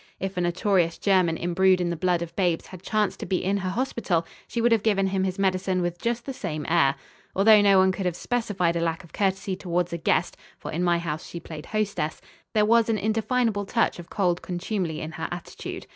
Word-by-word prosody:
If 195 Hz, 0 st, -3 dB
a 180 Hz, -, 0 dB
notorious 175 Hz, -1 st, +1 dB
German 185 Hz, -5 st, +2 dB
imbrued 185 Hz, +2 st, +3 dB
in 175 Hz, -1 st, 0 dB
the -, -, -1 dB
blood 175 Hz, 0 st, +1 dB
of 170 Hz, -, -9 dB
babes 175 Hz, -4 st, +1 dB
had 185 Hz, -2 st, -11 dB
chanced 210 Hz, +1 st, 0 dB
to -, -, -5 dB
be 185 Hz, -, 0 dB
in 195 Hz, +2 st, +1 dB
her 185 Hz, -2 st, -2 dB
hospital, 200 Hz, -6 st, -1 dB, 0.2 s
she 235 Hz, -, -3 dB
would 235 Hz, +1 st, +3 dB
have 225 Hz, -2 st, +4 dB
given 200 Hz, -2 st, +2 dB
him 190 Hz, 0 st, 0 dB
his 185 Hz, 0 st, -2 dB
medicine 190 Hz, -1 st, +1 dB
with 175 Hz, -1 st, -2 dB
just 235 Hz, 0 st, -1 dB
the 270 Hz, -, -4 dB
same 155 Hz, -, -4 dB
air. 160 Hz, -5 st, +3 dB, 0.4 s
Although 210 Hz, +2 st, +7 dB
no 200 Hz, -1 st, +5 dB
one 190 Hz, 0 st, +5 dB
could 185 Hz, 0 st, -2 dB
have 175 Hz, -, -1 dB
specified 195 Hz, -6 st, -1 dB
a -, -, +1 dB
lack 165 Hz, +2 st, -1 dB
of 170 Hz, -, -17 dB
courtesy 195 Hz, -1 st, 0 dB
towards 175 Hz, -1 st, -2 dB
a 170 Hz, -, -3 dB
guest -, -, +1 dB, 0.2 s
for -, -, -7 dB
in 170 Hz, +3 st, -1 dB
my 175 Hz, -1 st, +3 dB
house 160 Hz, -2 st, -4 dB
she 170 Hz, -, -7 dB
played 155 Hz, -2 st, -9 dB
hostess 205 Hz, -7 st, -2 dB, 0.4 s
there 210 Hz, -1 st, +4 dB
was 230 Hz, +1 st, +4 dB
an 220 Hz, -, +2 dB
indefinable 220 Hz, 0 st, 0 dB
touch 230 Hz, -5 st, +1 dB
of 170 Hz, -, -10 dB
cold 180 Hz, -4 st, 0 dB
contumely 175 Hz, -2 st, -3 dB
in 155 Hz, -, -5 dB
her 160 Hz, 0 st, -4 dB
attitude. 175 Hz, -1 st, -7 dB
185 Hz, 225 wpm, -25 LUFS, 170-205 Hz, 0.4 s, Although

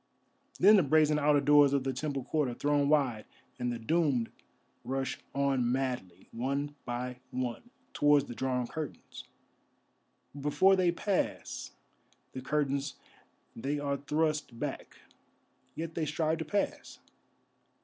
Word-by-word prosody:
Then 210 Hz, +3 st, +8 dB
the -, -, +6 dB
brazen 150 Hz, 0 st, +3 dB
outer 145 Hz, 0 st, +4 dB
doors 145 Hz, -1 st, +6 dB
of 140 Hz, -2 st, +1 dB
the 135 Hz, 0 st, -1 dB
temple 140 Hz, 0 st, -3 dB
court 145 Hz, 0 st, 0 dB
are 120 Hz, -, -5 dB
thrown 145 Hz, 0 st, +1 dB
wide 130 Hz, -8 st, +2 dB, 0.3 s
and 125 Hz, 0 st, -1 dB
the 120 Hz, -, -3 dB
doomed 130 Hz, -1 st, +1 dB, 0.5 s
rush 135 Hz, 0 st, -2 dB, 0.2 s
on 135 Hz, -3 st, +1 dB
madly, 125 Hz, -9 st, -3 dB
one 140 Hz, +4 st, -2 dB
by 125 Hz, +1 st, -4 dB
one, 130 Hz, -, -4 dB, 0.2 s
towards 145 Hz, -1 st, +4 dB
the 120 Hz, -, -7 dB
drawn 125 Hz, 0 st, -1 dB
curtains. 155 Hz, +3 st, -7 dB, 1.1 s
But 145 Hz, -, -9 dB
before 185 Hz, +7 st, +4 dB
they 180 Hz, -2 st, +3 dB
pass 190 Hz, +2 st, -2 dB, 0.6 s
the 130 Hz, -, -6 dB
curtains 140 Hz, 0 st, -1 dB, 0.6 s
they 140 Hz, +5 st, -2 dB
are 140 Hz, -1 st, -1 dB
thrust 150 Hz, -3 st, -1 dB
back, -, -, -5 dB, 0.8 s
yet 165 Hz, 0 st, -5 dB
they 160 Hz, -2 st, -2 dB
strive 160 Hz, +2 st, 0 dB
to 160 Hz, -, -3 dB
pass. 200 Hz, +6 st, -2 dB
140 Hz, 135 wpm, -31 LUFS, 130-155 Hz, 1.1 s, Then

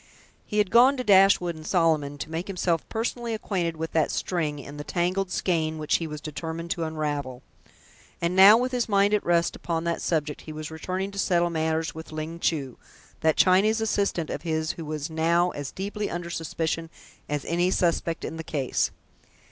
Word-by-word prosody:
He 210 Hz, -, -3 dB
had 205 Hz, -3 st, +2 dB
gone 255 Hz, +4 st, +6 dB
to 255 Hz, -, -2 dB
Dashwood 195 Hz, -4 st, +5 dB
and 155 Hz, -, -10 dB
Solomon 155 Hz, -5 st, +1 dB
to 155 Hz, -, -6 dB
make 165 Hz, +3 st, -3 dB
himself 175 Hz, -4 st, -1 dB
personally 230 Hz, 0 st, -2 dB
acquainted 175 Hz, -6 st, -2 dB
with 160 Hz, +1 st, -4 dB
that 160 Hz, -2 st, +2 dB
string 155 Hz, -5 st, -1 dB
in 145 Hz, +1 st, -9 dB
the 145 Hz, -, -5 dB
tangled 180 Hz, +4 st, -1 dB
skein 160 Hz, -4 st, 0 dB
which 155 Hz, -1 st, +1 dB
he 165 Hz, -, -4 dB
was 150 Hz, -1 st, -6 dB
determined 160 Hz, +2 st, -5 dB
to 170 Hz, -, -1 dB
unravel; 145 Hz, -5 st, -3 dB, 0.8 s
and 170 Hz, +1 st, -1 dB
now, 195 Hz, +3 st, +9 dB
with 250 Hz, +2 st, 0 dB
his 245 Hz, -2 st, -1 dB
mind 200 Hz, 0 st, +3 dB
at 210 Hz, -, +2 dB
rest 170 Hz, -1 st, +2 dB
upon 165 Hz, -1 st, -3 dB
that 170 Hz, 0 st, -1 dB
subject, 150 Hz, -3 st, -1 dB
he 155 Hz, -, -9 dB
was 155 Hz, 0 st, -6 dB
returning 185 Hz, +5 st, -3 dB
to 200 Hz, -, -6 dB
settle 175 Hz, -2 st, +2 dB
matters 160 Hz, 0 st, -1 dB
with 160 Hz, 0 st, -9 dB
Ling 155 Hz, +2 st, -5 dB
Chu, 140 Hz, -7 st, -1 dB, 0.4 s
that 160 Hz, -1 st, +2 dB
Chinese 200 Hz, +4 st, +4 dB
assistant 200 Hz, -6 st, 0 dB
of -, -, -4 dB
his 160 Hz, -1 st, -1 dB
who 165 Hz, -, -8 dB
was 155 Hz, +1 st, -4 dB
now 170 Hz, +2 st, +2 dB
as 145 Hz, -2 st, -6 dB
deeply 205 Hz, +2 st, -4 dB
under 175 Hz, 0 st, -5 dB
suspicion 165 Hz, 0 st, -2 dB, 0.4 s
as 150 Hz, -1 st, -2 dB
any 175 Hz, +2 st, +1 dB
suspect 170 Hz, -2 st, 0 dB
in 160 Hz, -, -5 dB
the 160 Hz, -, -5 dB
case. 140 Hz, -5 st, 0 dB
170 Hz, 190 wpm, -26 LUFS, 155-190 Hz, 0.8 s, now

